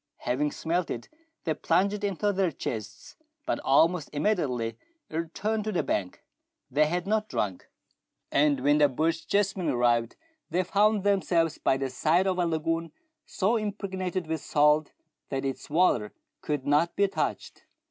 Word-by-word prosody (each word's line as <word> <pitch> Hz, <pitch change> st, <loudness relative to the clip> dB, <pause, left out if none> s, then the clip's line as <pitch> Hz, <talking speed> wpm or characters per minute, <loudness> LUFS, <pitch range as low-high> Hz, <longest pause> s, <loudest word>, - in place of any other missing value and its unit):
Having 140 Hz, +4 st, 0 dB
smelt 170 Hz, +2 st, -1 dB
it, 115 Hz, -, -5 dB, 0.3 s
they 160 Hz, -, 0 dB
plunged 200 Hz, +6 st, +1 dB
in 200 Hz, -2 st, 0 dB
to 205 Hz, +4 st, 0 dB
their 190 Hz, -3 st, +1 dB
chests, 110 Hz, -6 st, -6 dB, 0.3 s
but -, -, -1 dB
almost 160 Hz, +4 st, +3 dB
imme 155 Hz, +9 st, +2 dB
diately 120 Hz, -, -2 dB, 0.4 s
returned 190 Hz, +7 st, -2 dB
to 215 Hz, -, -1 dB
the 180 Hz, -, 0 dB
bank. 95 Hz, -3 st, -3 dB, 0.5 s
They 150 Hz, +3 st, +3 dB
had 175 Hz, +3 st, -2 dB
not 215 Hz, +1 st, 0 dB
drunk, 95 Hz, -4 st, -3 dB, 0.6 s
and 145 Hz, -2 st, +3 dB
when 145 Hz, +2 st, +3 dB
the 145 Hz, -1 st, +5 dB
Bochjesmen 165 Hz, +6 st, 0 dB
arrived 120 Hz, -1 st, +1 dB, 0.3 s
they 180 Hz, +3 st, +1 dB
found 205 Hz, +2 st, +2 dB
themselves 175 Hz, -5 st, +1 dB
by 135 Hz, -, +2 dB
the 135 Hz, -1 st, -3 dB
side 165 Hz, +8 st, +2 dB
of 185 Hz, -1 st, 0 dB
a 175 Hz, -, +2 dB
lagoon 165 Hz, 0 st, -1 dB, 0.4 s
so 210 Hz, +5 st, +1 dB
impregnated 190 Hz, -4 st, -3 dB
with 160 Hz, 0 st, -3 dB
salt 150 Hz, 0 st, +3 dB, 0.4 s
that 135 Hz, 0 st, -2 dB
its 135 Hz, -1 st, -4 dB
water 145 Hz, -10 st, +2 dB, 0.3 s
could 145 Hz, -3 st, -2 dB
not 150 Hz, +4 st, +2 dB
be 200 Hz, -, +3 dB
touched. 195 Hz, -, -4 dB
165 Hz, 155 wpm, -27 LUFS, 145-190 Hz, 0.6 s, the